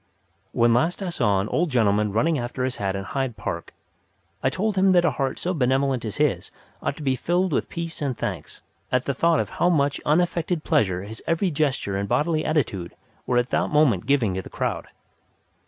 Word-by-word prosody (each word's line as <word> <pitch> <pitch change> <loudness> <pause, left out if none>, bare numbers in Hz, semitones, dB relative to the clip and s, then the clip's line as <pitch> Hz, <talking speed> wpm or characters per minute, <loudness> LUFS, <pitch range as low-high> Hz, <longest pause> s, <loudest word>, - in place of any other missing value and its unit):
When 120 0 +3
last 165 - +1
I 185 - -2
saw 100 - +1
an 100 - -3
old 175 +1 +1
gentleman 105 -5 +2
running 150 +8 +1
after 120 +1 -3
his 130 0 -2
hat 100 -1 -1
in 95 - -3
Hyde 130 +1 -3
Park, 85 -5 -5 0.7
I - - +2
told 210 +1 -1
him 190 0 +4
that 175 -1 +4
a 165 - +3
heart 135 +1 -2
so 180 - -2
benevolent 130 -3 +1
as 110 -3 -5
his 130 -13 +1 0.3
ought 140 - -2
to 155 - -7
be 135 -2 +1
filled 175 +6 0
with - - 0
peace 170 -2 -5
and 135 -5 -1
thanks - - -5 0.3
at 125 0 +1
the 140 - 0
thought 165 +4 +2
of - - -2
how 175 - +5
much 145 -4 +1
unaffected 170 +1 +1
pleasure 95 -3 +1
his 110 +2 -9
every 170 +2 +1
gesture 135 -10 0
and 100 0 -3
bodily 155 +1 +1
attitude 105 - -1 0.3
were 125 - +2
at 120 +1 +1
that - - +1
moment 135 - +3
giving 130 -9 +2
to 95 - -2
the - - -11
crowd. - - -3
135 Hz, 205 wpm, -24 LUFS, 110-165 Hz, 0.7 s, how